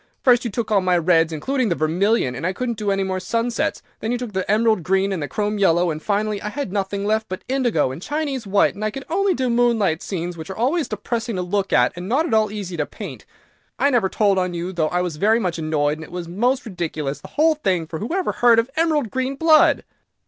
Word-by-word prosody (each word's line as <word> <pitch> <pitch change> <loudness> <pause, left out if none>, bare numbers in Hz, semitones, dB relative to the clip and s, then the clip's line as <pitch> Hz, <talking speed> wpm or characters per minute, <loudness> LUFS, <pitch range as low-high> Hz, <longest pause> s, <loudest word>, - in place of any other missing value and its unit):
First 245 -2 +5
you 235 - -2
took 225 +1 -3
all 200 -2 +4
my 180 -1 +2
reds, 165 -1 +3
including 250 - -1
the 170 - +1
vermilion, 165 - +1
and 125 - -7
I 185 +3 0
couldn't 235 +1 -3
do 210 -1 -1
any 195 0 +1
more 190 -1 -2
sunsets, 230 +4 -1 0.2
then 225 - -2
you 245 - 0
took 240 -4 -6
the 190 0 -2
emerald 215 -1 +3
green 190 +3 +1
and 185 -4 -2
the 145 - -2
chrome 210 +7 -2
yellow, 175 -2 +3
and 155 0 -5
finally 210 +1 -1
I 210 - -3
had 280 -3 -4
nothing 200 0 -2
left 220 +1 0
but 185 - -5
indigo 240 - +1
and 135 - -8
Chinese 285 -3 -3
white, 200 +1 +3
and 215 +1 -3
could 270 +4 -7
only 390 +1 +2
do 260 -1 -1
moonlight 235 -8 +2
scenes, 175 -2 -4
which 160 +1 -8
are 190 - -6
always 280 +8 +1
depressing 225 +1 -3
to 180 - -1
look 195 +2 -1
at, 125 0 +3
and 180 +2 -6
not 280 +7 +2
at 235 - -2
all 215 -2 +3
easy 200 -4 -5
to 150 - 0
paint. - - -9 0.5
I 285 - +2
never 230 -7 +2
told 200 -2 +2
on 180 -1 -1
you, 175 +2 -4
though 160 -3 0
I 180 0 0
was 170 -4 -4
very 215 +7 +3
much 175 -6 -2
annoyed, 155 -1 0
and - - -7
it - - -12
was 175 -1 -5
most 245 +10 0
ridiculous, 160 -8 -4
the - - -10
whole 320 +2 +3
thing; 190 - -1
for 160 0 -6
who 220 - -4
ever 370 +1 0
heard 240 -1 +4
of 230 +3 +1
emerald 305 - +1
green 260 +1 -2
blood?" 310 +1 +4
205 Hz, 250 wpm, -21 LUFS, 175-240 Hz, 0.5 s, First